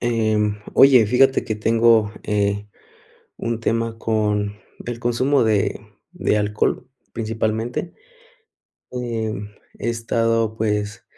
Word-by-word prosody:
Eh, 115 -3 +1 0.4
oye, 130 -5 +7
fíjate 130 +4 +3
que 110 - -2
tengo, 115 0 +3
eh, 100 0 -1 0.7
un 115 -1 -3
tema 115 0 -1
con 105 -2 -1 0.3
el 120 -1 -5
consumo 125 +3 +2
de 105 -2 +1 0.3
de 180 -11 0
alcohol, 105 +4 -1 0.3
principalmente. 115 +6 -2 1.0
Em, 110 -4 -4 0.3
he 115 - -3
estado, 115 -1 0
pues, 105 -1 -2
115 Hz, 100 wpm, -21 LUFS, 105-120 Hz, 1.0 s, oye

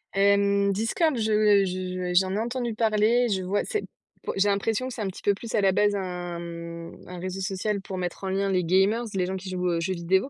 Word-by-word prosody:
Hem, 200 0 +3
Discord, 240 - +1
je 210 -2 +4
je 185 -1 -3
j'en 190 +1 +3
ai - - 0
entendu 240 0 -2
parler, 225 +2 +3
je 190 -3 0
vois, 185 +3 0
c'est, 430 -3 -2 0.4
po - - -3
j'ai 195 +1 +3
l'impression 220 +5 0
que 260 - -6
c'est 230 - -6
un 205 - -1
petit 190 - -8
peu 205 - +4
plus 225 +3 -6
à 215 - +3
la 195 -1 +4
base 205 +2 +2
un, 180 -2 -4
mmh, 170 0 -8
un 180 - -8
réseau 185 +1 -4
social 195 +1 -2
pour 190 -1 -6
mettre 180 +1 -4
en 190 - -2
lien 195 +1 0
les 185 -1 +2
gamers, 195 +7 +3
les 185 -2 +1
gens 190 +1 -3
qui 190 0 -6
jouent 180 -1 -2
aux 170 -1 +1
jeux 185 +2 -1
vidéo. 190 +8 +1
195 Hz, 240 wpm, -26 LUFS, 185-215 Hz, 0.4 s, je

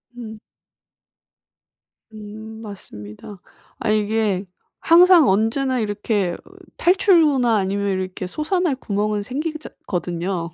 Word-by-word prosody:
음. 220 -3 -9 1.7
음 220 +1 -10
맞습니다. 185 - -10 0.4
아 215 - -2
이게 210 -2 0 0.3
항상 345 -1 +6
언제나 235 +6 +1
이렇게 205 -3 -1 0.4
탈출구나 315 - +4
아니면 200 +1 -1
이렇게 185 0 -5
솟아날 315 - -1
구멍은 210 -3 -2
생기기자 305 +6 -5 0.2
거든요. 175 -1 -3
215 Hz, 230 characters per minute, -21 LUFS, 195-270 Hz, 1.7 s, 항상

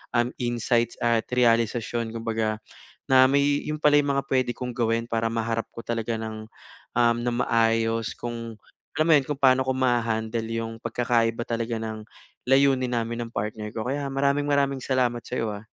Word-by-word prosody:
um, 120 +1 +2
insights 120 -1 0
at 115 -1 +2
realisasyon 115 -1 +1
kumbaga, 110 -1 -2 0.5
na 130 -1 +6
may 140 +1 +3 0.2
yun 155 0 -3
pala 145 -1 +5
yung 140 -1 0
mga 140 - 0
pwede 130 -2 +2
kong 125 +1 -4
gawin 115 -1 +1
para 115 0 +1
maharap 115 0 -2
ko 115 - -7
talaga 115 -1 -2
ng, 110 -1 -6 0.5
um, 120 -1 +3
ng 120 0 -1
maayos 115 0 +1
kung 115 -1 -6 0.4
alam 155 - +2
mo 165 - +4
yun, 135 - -6
kung 145 -2 -3
paano 130 -1 +5
ko - - +2
maha-handle 115 -3 0
yung 115 0 -4
pagkakaiba 115 0 0
talaga 115 0 -2
ng 110 -1 -5 0.4
layunin 135 -1 +3
namin 115 0 -2
ng - - -15
partner 105 +1 -3
ko. 110 +1 -3
Kaya 140 +1 -2
maraming-maraming 140 0 +1
salamat 125 -3 0
sa'yo, 115 -3 -3
ha. 100 - -8
120 Hz, 170 wpm, -25 LUFS, 115-130 Hz, 0.5 s, na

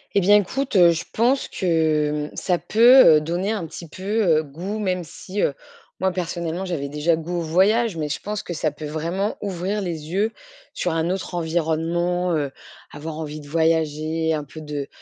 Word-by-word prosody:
Eh 200 - +5
bien, 205 +3 +6
écoute, 235 +5 0
heu, 175 -2 +7
je 165 0 -3
pense 250 +5 +2
que, 155 -4 0
mmh, - - -16
ça 180 -2 0
peut, 235 -6 +7
heu, 150 - +1
donner 175 +5 -2
un 210 -7 -2
petit 165 +1 -9
peu, 185 +5 -11 0.4
heu, - - -9
goût. 175 +9 -6
Même 185 -4 -1
si, 185 +5 -6
heu, 140 - +1 0.4
moi 190 0 +1
personnellement, 175 0 -3
j'avais 160 -6 -3
déjà 150 +4 +1
goût 170 +2 -4
au - - -2
voyage, 190 +5 +2
mais 150 -1 -2
je - - -2
pense 210 0 -4
que 175 - -5
ça 155 -1 0
peut 150 +1 -9
vraiment 170 +7 -2
ouvrir 195 +1 -2
les 165 -4 -5
yeux 210 +4 +1 0.4
sur 175 - -1
un 165 +1 0
autre 190 0 -3
environnement. 170 +2 0
Heu, 145 -3 -1 0.4
avoir 155 +1 -7
envie 155 -1 -5
de 145 - -12
voyager, 160 0 +1
un 150 - -3
peu 155 +3 -11
de 145 -2 -5
170 Hz, 195 wpm, -22 LUFS, 155-190 Hz, 0.4 s, heu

